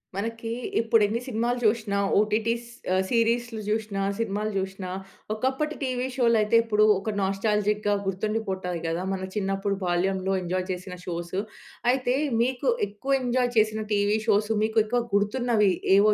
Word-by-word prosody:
మనకి 225 +2 -3 0.3
ఇప్పుడు 225 -1 +3
ఎన్ని 225 +3 -2
సినిమాలు 240 +1 0
చూసినా, 215 -2 +1 0.2
ఓటిటీస్ 225 +3 0 0.3
ఆహ్, 190 - +3
సీరీస్‌లు 230 -1 +1
చూసినా, 215 -2 -1 0.2
సినిమాలు 215 -1 -1
చూసినా 190 -1 -5 0.4
ఒకప్పటి 265 +7 -1
టీవీ 255 -1 -1
షో‌లు 235 -3 +3
అయితే 210 +2 +2
ఇప్పుడు 215 -2 +2 0.2
ఒక 215 +2 -3
నాస్టాల్జిక్‌గా 205 +1 +1
గుర్తుండిపోతాయి 190 -3 -2
కదా! 165 +2 -1
మన 190 0 -3
చిన్నప్పుడు 195 0 -1
బాల్యంలో 190 +2 0
ఎంజాయ్ 185 +1 -1
చేసిన 180 0 -6
షోస్. 175 0 -4 0.6
అయితే 255 -1 +1 0.3
మీకు 255 - 0 0.2
ఎక్కువ 270 +7 -1
ఎంజాయ్ 245 0 +1
చేసిన 215 0 +3
టీవీ 205 +1 +2
షోస్ 210 0 +3
మీకు 220 +1 +2
ఎక్కువ 240 +3 +1
గుర్తున్నవి 210 0 +2 0.3
ఏవో 210 +1 +5
215 Hz, 140 wpm, -26 LUFS, 195-230 Hz, 0.6 s, ఏవో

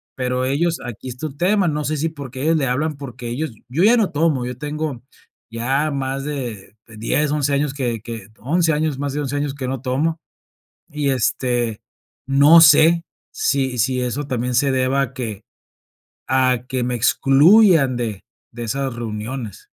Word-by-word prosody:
Pero 125 0 -1
ellos, 165 +6 0
aquí 120 +2 -7
está 125 +6 -5
el 140 - -11
tema, 195 +2 +2
no 150 -1 -1
sé 155 +1 -1
si 155 +3 0
porque 135 -4 -8
ellos 165 +1 +3
le 140 - 0
hablan, 150 +5 -1
porque 125 -4 -8
ellos 140 +5 -3 0.2
yo 150 +8 +1
ya 230 +4 +6
no 215 -5 +1
tomo, 150 -4 +1
yo 125 0 -5
tengo 150 -3 -4 0.5
ya 135 +6 0
más 135 -1 -3
de 120 -9 -6
de 110 - -13
10 145 +7 0
11 145 -1 0
años 140 0 0
que 120 -5 -2
que 115 -3 -8
11 165 +5 +1
años, 150 -2 -1
más 145 -1 -2
de 145 - -2
11 140 0 -3
años 145 -1 -2
que 135 -2 -4
no 130 -1 -3
tomo, 150 +5 -1 0.7
y 145 -2 -1
este, 120 -3 -1 0.4
no 140 +5 +7
sé, 160 +2 +6 0.3
si 135 -2 0
si 125 +2 +1
eso 125 +4 -3
también 125 -1 -2
se 135 +2 +2
deba 130 +1 +1
a 135 -1 -4
que 110 -5 -5 0.9
a 130 -2 +2
que 130 -2 -1
me 125 - -1
excluyan 140 - +5
de 110 -5 -4 0.3
de 120 0 -6
esas 135 +2 -2
reuniones. 115 0 -6
135 Hz, 180 wpm, -20 LUFS, 125-150 Hz, 0.9 s, no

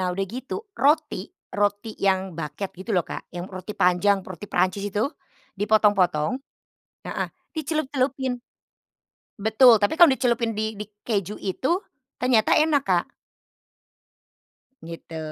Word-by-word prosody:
Nah, 185 -1 0
udah 195 +2 -1
gitu 260 - -6
roti, 295 - +1 0.2
roti 205 +2 0
yang 190 -2 +1
baguette 165 +5 -5
gitu 190 +5 -8
loh, 180 -5 +1
Kak, - - -7
yang 175 0 -6
roti 190 +2 -7
panjang, 185 +2 +3
roti 190 +2 -9
Perancis 185 +2 +1
itu, 210 +5 +1 0.5
dipotong-potong 205 -5 +3 0.8
heeh, - - -2 0.3
dicelup-celupin. 270 -4 -1 1.0
Betul, 220 +3 +6
tapi 205 +6 +1
kalau 340 -1 +8
dicelupin 235 -4 +1
di 220 0 -1
di 210 0 -8 0.2
keju 205 -3 -1
itu 260 - 0 0.4
ternyata 250 -4 +3
enak, 305 -2 +3
Kak. 180 -2 +2 1.8
Gitu, 165 0 -8
205 Hz, 120 wpm, -24 LUFS, 185-255 Hz, 1.8 s, kalau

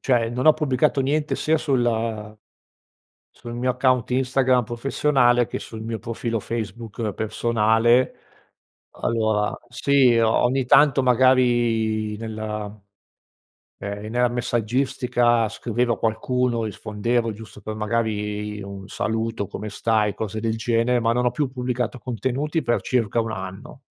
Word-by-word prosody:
cioè 120 -4 +2
non 125 +3 -2
ho 155 - +9
pubblicato 145 -1 +1
niente 150 +3 0
sia 160 +1 +1
sulla 115 -6 -1 0.9
sul 120 0 -10
mio 125 +1 0
account 125 -1 +1
Instagram 130 -1 +2
professionale, 120 +1 +2
che - - -5
sul 110 -1 -8
mio 110 -1 -4
profilo 115 +1 -3
Facebook 110 0 -4
personale 115 +3 +2 0.8
allora, 110 -2 0
sì, 130 -1 +3
ogni 120 +3 +2
tanto 135 +1 +5
magari 120 -4 +2
nella 110 -1 -5 1.1
ehm, 100 0 -5
nella 125 0 +2
messaggistica 120 -1 +1
scriveva 120 +1 -1
qualcuno, 120 +1 0
rispondevo 110 +2 -1
giusto 105 0 -12
per 110 +1 -6
magari 105 -1 -2
un 100 -1 -8
saluto, 110 -1 -2
come 105 +1 -6
stai, 105 -1 0
cose 110 +1 -4
del 110 0 -1
genere, 115 +2 +1
ma 115 0 +2
non 125 +1 0
ho 125 - +3
più 140 +1 -1
pubblicato 125 -1 -3
contenuti 130 +7 -2
per 120 -1 +1
circa 120 -3 0
1 110 -1 -3
anno. 95 -2 -8
115 Hz, 125 wpm, -23 LUFS, 110-125 Hz, 1.1 s, ho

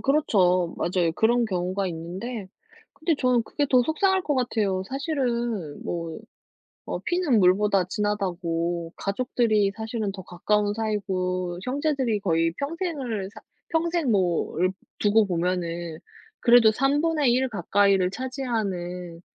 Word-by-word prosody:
그렇죠. 185 - +2
맞아요. 175 -2 0
그런 235 +2 +3
경우가 185 0 -1
있는데 185 +6 -5 0.4
근데 320 0 0
저는 250 -3 +3
그게 285 +5 -2
더 250 -1 +6
속상할 380 - +1
것 295 - 0
같아요. 215 -7 0
사실은 240 - -2
뭐 165 0 -4 0.7
어 - - -2
피는 345 - +1
물보다 195 +1 +4
진하다고 175 -5 -2
가족들이 215 -1 +1
사실은 220 -2 -3
더 190 -2 -9
가까운 205 +3 0
사이고 185 -5 -2
형제들이 265 -4 0
거의 165 -3 +1
평생을 280 - -3
사 - - -12 0.3
평생 330 -3 0
뭐 185 -5 +1
얽 185 - 0 0.2
두고 210 0 +3
보면은 170 -2 -2 0.4
그래도 235 -2 +6
3 270 +5 +1
분의 310 -6 +2
1 260 +1 +1
가까이를 200 -3 +2
차지하는 195 -9 -4
210 Hz, 275 characters per minute, -25 LUFS, 180-255 Hz, 0.7 s, 더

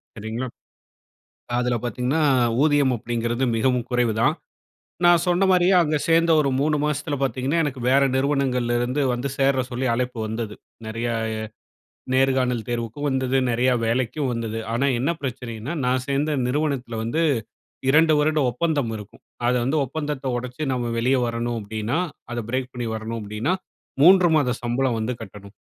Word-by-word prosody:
சரிங்களா? 110 +4 -4 1.1
அதில 125 0 +1
பார்த்தீங்கன்னா, 125 +6 0 0.4
ஊதியம் 145 -4 +3
அப்டிங்கிறது 120 +2 -2
மிகவும் 125 0 +1
குறைவுதான். 120 +3 +2 0.7
நான் 175 -1 +6
சொன்னமாரியே 185 0 +4
அங்க 155 -1 +1
சேர்ந்த 165 0 +4
ஒரு 140 -2 +2
3 150 0 +2
மாசத்தில 150 0 -1
பார்த்தீங்கன்னா, 135 +5 0
எனக்கு 135 -3 -3
வேற 140 +1 +5
நிறுவனங்கள்லருந்து 130 -1 0
வந்து 125 +3 -2
சேர 135 -1 +2
சொல்லி 125 +2 -2
அழைப்பு 125 -1 -2
வந்தது. 110 -1 -4 0.3
நிறையா 115 +1 -2 1.0
நேர்காணல் 130 -4 +2
தேர்வுக்கும் 120 +4 -3
வந்தது. 130 0 0
நிறையா 125 +2 +2
வேலைக்கும் 130 +3 0
வந்தது. 115 -1 -3
ஆனா, 130 +4 +1
என்ன 140 +7 +1
பிரச்சனையின்னா, 125 +1 -5
நான் 130 0 +1
சேர்ந்த 145 +2 0
நிறுவனத்தில 130 -4 -1
வந்து 155 +9 0 0.7
2 160 +1 +5
வருட 155 +1 +2
ஒப்பந்தம் 145 -2 0
இருக்கும். 105 -1 -12 0.3
அத - - +3
வந்து 140 +5 +1
ஒப்பந்தத்த 145 0 -4
ஒடச்சு, 125 +4 -6
நம்ம 120 -2 -2
வெளிய 130 +3 +2
வரணும் 115 0 -2
அப்டின்னா, 110 - -2 0.3
அத 120 - -3
பிரேக் 130 0 -2
பண்ணி 120 -2 -3
வரணும் 110 +1 -4
அப்டின்னா, 105 - -1 0.5
3 180 0 +7
மாத 140 -4 +2
சம்பளம் 120 0 0
வந்து 120 +3 -2
கட்டணும். 100 -1 -12
125 Hz, 140 wpm, -23 LUFS, 120-145 Hz, 1.1 s, 3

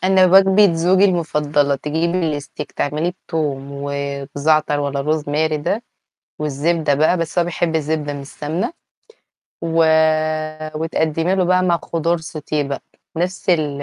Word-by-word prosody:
أنا 185 0 +4
وجبة 195 +1 +6
زوجي 185 +4 +3
المفضلة، 150 -5 +1
تجيبي 160 +2 -1
الSteak 145 +1 -7
تعمليه 155 +4 -1 0.2
بتوم 145 -4 -2
وبزعتر 140 +2 -1
والّا 140 -1 -2
Rosemary 155 0 0
ده، 200 +10 -1 0.6
والزبدة 150 +1 0
بقى، 155 +5 +3
بس 165 +1 -1
هو 170 - +2
بيحب 170 -1 -1
الزبدة 150 -1 -1
مش 140 -1 -7
سمنة، 160 - -3 0.9
و 165 0 +2 0.9
وتقدّمي 160 +2 0
له 185 -2 +2
بقى 185 +1 +3
مع 170 -2 +2
خضار 170 +1 0
sauté 155 -1 -7
بقى، 140 -1 -4 0.3
نفْس 185 +2 -1
ال 150 -4 0
155 Hz, 130 wpm, -19 LUFS, 145-175 Hz, 0.9 s, وجبة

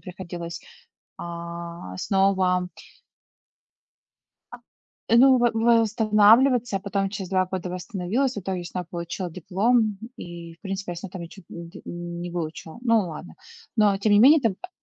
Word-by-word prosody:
приходилось, 175 -3 -7 0.6
а, 170 - -7
снова 190 -2 +2 1.8
а, - - -9 0.5
ну, 255 +3 +7
во 240 -1 +3
восстанавливаться, 225 +1 +4
я - - -11
потом 195 0 -1
через 195 -3 -6
2 185 -1 +2
года 185 -1 -4
восстановилась, 195 +7 -2
в - - -3
итоге 185 -1 -4
снова 180 0 -5
получила 170 +1 -5
диплом 205 +4 +1 0.2
и, 170 -1 -9
в - - -42
принципе, 195 -2 -4
я - - -9
снова 180 +2 -8
там 185 - -7
ничего 170 +1 -12
нь 170 -1 -8
дь - - -12
не 175 0 -6
выучила. 165 0 -5
Ну, 230 -3 +3
ладно. 85 - -9 0.4
Но, 205 -2 +4
тем 205 +1 +1
не 205 - +6
менее, 285 +6 +7
там, 220 -6 +1
а 365 - -7
190 Hz, 150 wpm, -24 LUFS, 175-215 Hz, 1.8 s, ну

